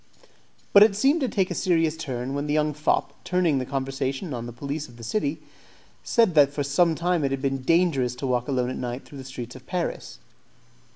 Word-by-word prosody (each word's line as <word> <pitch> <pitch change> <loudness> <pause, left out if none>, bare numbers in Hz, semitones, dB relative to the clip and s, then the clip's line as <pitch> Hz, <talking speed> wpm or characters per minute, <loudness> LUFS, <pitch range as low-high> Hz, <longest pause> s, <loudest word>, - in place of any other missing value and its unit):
But 200 - +9
it 210 -1 +6
seemed 275 +9 +3
to 260 - +1
take 190 -3 0
a - - 0
serious 165 -3 +1
turn 130 -4 -4
when 145 +1 -2
the 150 - 0
young 150 0 +1
fop, 150 +2 0
turning 175 -6 +1
the 130 - -4
conversation 135 +3 -3
on 120 -1 -5
the - - -6
police 140 +5 -5
of 120 - -16
the 115 - -11
city, 145 - -2 0.6
said 225 -6 +3
that 145 -3 +5
for 145 0 -2
some 160 +4 +2
time 175 -1 0
it 135 - +1
had 135 0 -2
been 135 0 -1
dangerous 140 -5 +2
to 125 - -5
walk 125 -2 0
alone 125 -3 0
at - - -5
night 125 +1 -5
through 140 - -11
the - - -7
streets 125 -2 -8
of 130 - -13
Paris. 180 -2 -3
140 Hz, 220 wpm, -25 LUFS, 130-170 Hz, 0.6 s, But